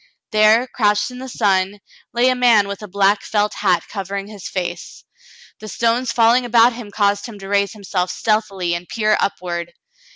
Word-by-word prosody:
There, 215 +2 +4
crouched 210 -2 0
in 250 - -9
the 260 0 -7
sun, 200 -3 0 0.3
lay 245 +2 +2
a 255 - +2
man 235 -5 +4
with 200 +1 -6
a 210 - -8
black 200 +1 +2
felt 210 -1 -1
hat - - +1
covering 195 -1 -5
his 205 -2 -9
face. 175 -2 -5 0.6
The 215 - -9
stones 235 +3 0
falling 235 +2 +4
about 235 0 +4
him 230 -3 -9
caused 205 +1 0
him 225 -3 -10
to 195 -1 -10
raise 200 0 +1
himself 190 -3 -3
stealthily 200 -6 -1
and 170 +1 -5
peer 215 -2 +1
upward. 175 -3 -3
210 Hz, 175 wpm, -19 LUFS, 195-230 Hz, 0.6 s, There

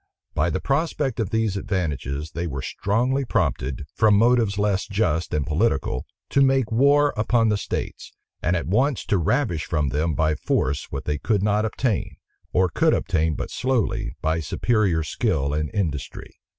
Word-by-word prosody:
By - - +1
the - - -1
prospect 140 -3 -1
of 110 -5 -1
these 110 -2 0
advantages, 75 - -3
they 85 +1 -3
were 70 -3 -4
strongly 125 - 0
prompted, 70 - -1
from 105 -2 +4
motives 115 -2 +3
less 100 -3 0
just 95 -5 0
and 75 -2 0
political, 80 - 0 0.2
to 140 - +3
make 135 -4 +3
war 140 +5 +4
upon 115 +1 +2
the 105 - +2
states; - - -5 0.3
and 85 +3 +1
at 85 - -1
once 130 - +1
to 100 - +1
ravish 85 - 0
from 75 -4 0
them 75 +3 0
by 80 +2 +2
force 70 0 -1
what 70 - -5
they 75 -1 -1
could 105 0 0
not 105 +1 +2
obtain, 110 -2 -1 0.4
or 95 0 +3
could - - +2
obtain 80 -1 0
but - - -5
slowly, 130 -4 -1
by 80 +1 +1
superior 90 +1 +1
skill 70 -1 -1
and 75 0 -1
industry. 85 -10 -3
100 Hz, 165 wpm, -23 LUFS, 75-115 Hz, 0.4 s, from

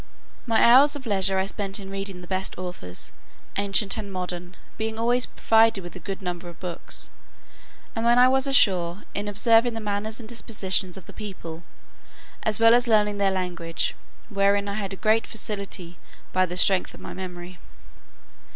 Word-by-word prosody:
My 225 -1 +3
hours 270 +5 +7
of 275 -2 -7
leisure 195 -3 +2
I 190 - +1
spent 195 0 -3
in 195 -1 -9
reading 195 -2 -4
the 175 - -11
best 190 0 -2
authors, 175 - -7 0.4
ancient 200 +1 +2
and 200 -2 -6
modern, 180 -1 -5 0.2
being 220 0 -3
always 240 +2 +2
provided 225 -3 +3
with 175 - -9
a - - -7
good 195 +3 -6
number 175 -1 -4
of 170 - -14
books; 180 -2 -4 0.8
and 225 - -2
when 235 +1 +4
I 250 +1 +7
was 265 +1 +2
ashore, 185 -8 +3
in 205 +1 -3
observing 225 +3 +4
the - - -3
manners 215 +1 -3
and 225 - -9
dispositions 195 -5 -1
of 190 - -11
the - - -12
people, 175 -6 -8 0.8
as 220 0 0
well 230 0 +7
as 245 +1 +4
learning 210 -2 +3
their 200 -1 +3
language; 175 -3 -2 0.3
wherein 200 -1 +2
I 200 - -3
had 200 -2 -4
a - - -4
great 220 +3 +2
facility, 200 -5 -4 0.3
by 185 0 +3
the 180 +1 -6
strength 190 0 +3
of - - -14
my - - -8
memory. 180 -1 -8
200 Hz, 180 wpm, -25 LUFS, 185-225 Hz, 0.8 s, hours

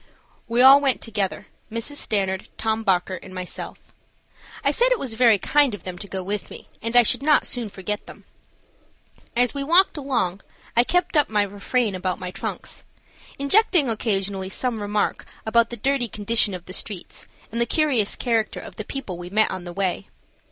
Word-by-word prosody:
We 235 +2 +3
all 275 +2 +9
went 270 -3 +2
together, 205 -4 -3 0.3
Mrs. 230 +6 -3
Stanard, 190 -5 -1
Tom 220 0 -1
Bockert, 185 -2 0
and 185 - -11
myself. 185 -1 -7 0.7
I - - +3
said - - +2
it - - +4
was 260 - -2
very 230 -2 +5
kind 280 +3 +2
of 190 - -14
them 180 -1 -7
to 200 - -7
go 190 -1 -4
with 205 +2 -3
me, - - -11
and 230 +2 -3
I 245 - +8
should 230 - +2
not 300 +1 +3
soon 240 -4 -2
forget 200 +2 -5
them. - - -12 1.1
As 245 0 +3
we 280 -1 -3
walked 345 +4 +4
along 235 -10 -1 0.3
I 240 - +6
kept 355 +5 0
up 295 -2 +4
my 210 -1 +2
refrain 205 +3 -1
about 185 0 -2
my 180 0 -6
trucks, - - -6 0.5
injecting 300 - +3
occasionally 195 -4 -1
some 235 +1 -1
remark 205 0 -1 0.2
about 230 +1 +3
the 240 - -6
dirty 270 +1 0
condition 210 -1 +2
of 180 -1 -9
the 185 - -8
streets 195 -2 -5 0.2
and 235 +1 -2
the 235 - +2
curious 265 -8 +2
character 230 -3 -1
of - - -11
the - - -4
people 225 -11 -6
we 175 0 -7
met 215 +3 +2
on 185 -1 -5
the 175 - -6
way. 195 +1 -2
220 Hz, 185 wpm, -23 LUFS, 195-255 Hz, 1.1 s, all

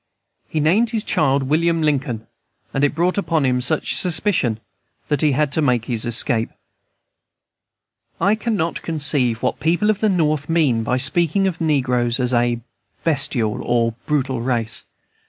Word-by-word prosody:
He 155 - -2
named 190 +10 +2
his 220 -2 -1
child 140 -2 +1
William 165 +4 +1
Lincoln, 135 -7 -1 0.5
and 135 - 0
it 145 0 +1
brought 180 +4 +1
upon 165 -7 0
him 125 -1 +1
such 150 +5 -1
suspicion 165 - +1 0.5
that 145 -2 0
he 150 -2 +2
had 150 +1 0
to 160 - +1
make 125 -6 +1
his 115 -1 -2
escape. 115 -1 +2 1.7
I 195 +5 +3
cannot 215 -7 -2
conceive 145 -7 0
what - - -1
people 175 +7 +2
at 210 - -4
the 215 - +2
North 155 -5 0
mean 150 -9 +2
by 125 +3 -1
speaking 170 +8 +3
of 185 -3 -2
the 165 - -1
negroes 125 -5 0
as 125 0 +1
a 120 0 +1 0.4
bestial 135 -8 0
or 115 -1 0
brutal 135 -5 -1
race. 115 -2 -1
145 Hz, 155 wpm, -20 LUFS, 125-165 Hz, 1.7 s, I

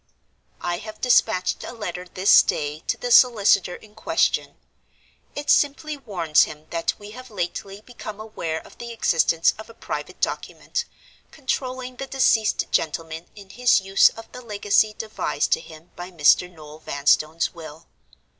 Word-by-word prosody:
"I 175 0 -2
have 215 0 -10
dispatched 225 -6 +2
a - - -7
letter 180 -5 -6
this 190 +2 +6
day 150 0 -2
to - - 0
the 245 - -4
solicitor 205 -7 +5
in 210 +2 -16
question. 220 - 0 0.8
It 290 0 0
simply 295 +1 +2
warns 180 - +2
him 150 0 -11
that 165 0 -1
we 205 0 -11
have 255 +3 -11
lately 195 +1 -5
become 215 -3 -9
aware 170 -7 -4
of - - -17
the 235 0 -7
existence 165 -6 +2
of 220 - -10
a 230 - -14
private - - -6
Document, 475 -1 -3 0.4
controlling 255 -3 -4
the 270 - -5
deceased 230 -5 +2
gentleman 160 +1 -2
in 200 -2 -13
his 245 0 +3
use 195 0 +5
of 225 - -13
the 250 - -9
legacy 210 -1 +1
devised 215 -8 -2
to - - +3
him 165 0 -14
by 175 +1 -7
Mr. 175 +1 +4
Noel 155 -2 -13
Vanstone's 155 +3 +1
will. 160 -1 -11
200 Hz, 155 wpm, -23 LUFS, 165-235 Hz, 0.8 s, this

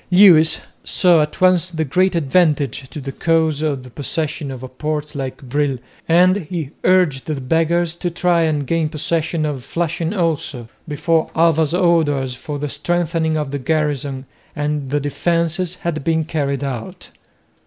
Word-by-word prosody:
Lewis 180 -4 +6 0.2
saw 175 -4 +3
at 150 0 -3
once 185 -1 +4
the 160 -2 -2
great 185 +6 +2
advantage 145 -5 +1
to - - -7
the 135 -1 -5
cause 160 0 +1
of 145 -4 -1
the 130 - -11
possession 150 +2 -3
of 130 -1 -7
a - - -5
port 150 +3 -4
like 135 -2 -4
Brill, 140 +1 0 0.3
and 180 +3 +5
he 165 -5 -5
urged 180 -8 +2
the 155 -3 -2
Beggars 165 +5 +1
to 175 - -2
try 175 0 +1
and 155 -3 0
gain 165 +2 0
possession 160 +1 -1
of 140 -4 -3
Flushing 170 +2 -2
also, 160 - -2 0.2
before 160 +2 0
Alva's 160 -1 +3
orders 155 -7 +2
for 145 +4 -6
the 150 +1 -3
strengthening 160 +2 -1
of 150 -3 -3
the 140 - -3
garrison 140 -2 -1 0.3
and 150 -2 -2
the 145 +2 +1
defences 170 +4 -1
had 170 -5 -4
been 160 0 +1
carried 140 -3 -2
out. 125 -5 -6
155 Hz, 160 wpm, -19 LUFS, 140-170 Hz, 0.3 s, Lewis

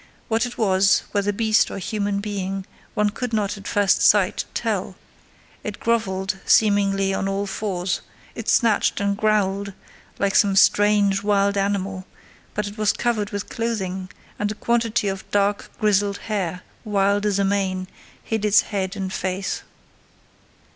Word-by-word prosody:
What 225 +1 +1
it 245 - -10
was, 195 -2 +3
whether 205 0 +1
beast 220 +1 +2
or - - -6
human 200 +1 -2
being, 195 -2 -4 0.3
one 210 -1 +2
could 245 +2 -4
not, 210 -2 0
at 200 -1 -10
first 205 -2 +2
sight, - - +4
tell: - - -2 0.7
it 210 -1 -5
grovelled, 195 -4 -1
seemingly, 195 -2 +3
on 195 - -1
all 195 +1 -1
fours; 190 -3 -2 0.3
it - - -5
snatched 225 -4 +3
and 200 0 0
growled 200 -2 0 0.4
like 200 -1 0
some 200 -2 +4
strange 205 0 +4
wild 200 -1 +2
animal: 195 -1 -1 0.5
but 210 - -1
it 205 +1 -8
was 215 -1 +3
covered 220 -4 -1
with 205 -2 -4
clothing, 190 -6 -3 0.3
and 210 0 0
a - - -5
quantity 230 -2 0
of 195 -1 -4
dark, 205 0 0
grizzled 205 -1 +2
hair, 185 -5 -3 0.2
wild 200 -1 +1
as 205 -2 +1
a 200 - +2
mane, 190 -2 -1 0.4
hid 220 -2 -2
its 210 0 +5
head 195 -1 -3
and 190 -2 -4
face. 190 +1 -2
200 Hz, 150 wpm, -22 LUFS, 195-210 Hz, 0.7 s, its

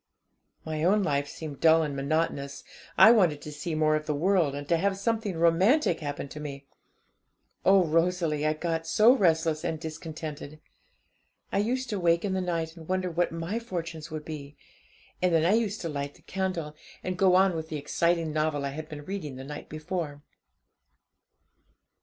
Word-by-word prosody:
My 155 -1 -3
own 200 +4 +3
life 140 -4 0
seemed 145 -1 -8
dull 160 0 +5
and 145 -2 -3
monotonous; 140 -1 -1 0.3
I 220 - +9
wanted 180 -10 +4
to 150 - -7
see 155 +2 -4
more 155 0 +3
of 155 0 -3
the 150 - 0
world, 170 -3 +2
and 145 0 -6
to 170 - +3
have 195 +3 0
something 215 -3 -1
romantic 170 - +3
happen 145 -2 -4
to 150 - -8
me. 140 -2 -7 1.0
Oh, 190 0 +6
Rosalie, 165 -1 +1
I 155 0 +2
got 165 0 -3
so 215 +8 +6
restless 160 - +2
and 165 -2 -2
discontented! 155 -2 -7 0.9
I - - +1
used 255 +5 0
to 205 - -1
wake 170 +1 +2
in 195 - -1
the 190 - 0
night, 165 -2 -2
and 160 -2 -12
wonder 185 -1 0
what 175 +1 0
my 165 +7 -3
fortunes 165 -7 -6
would 155 -1 -6
be; 145 -2 -8 0.6
and 180 -1 +3
then 160 0 +3
I 185 - +4
used 220 -2 0
to 170 - -3
light 140 -1 -4
the - - -21
candle, 185 -6 -3 0.3
and 185 - -2
go 185 0 +4
on 190 -1 +4
with 160 0 -5
the 155 - -3
exciting 165 +2 0
novel 155 -2 0
I - - -1
had 155 +3 -7
been 145 -2 -8
reading 180 -9 -5
the 130 - -8
night 145 +2 -8
before. 155 -2 -5
165 Hz, 185 wpm, -28 LUFS, 150-185 Hz, 1.0 s, I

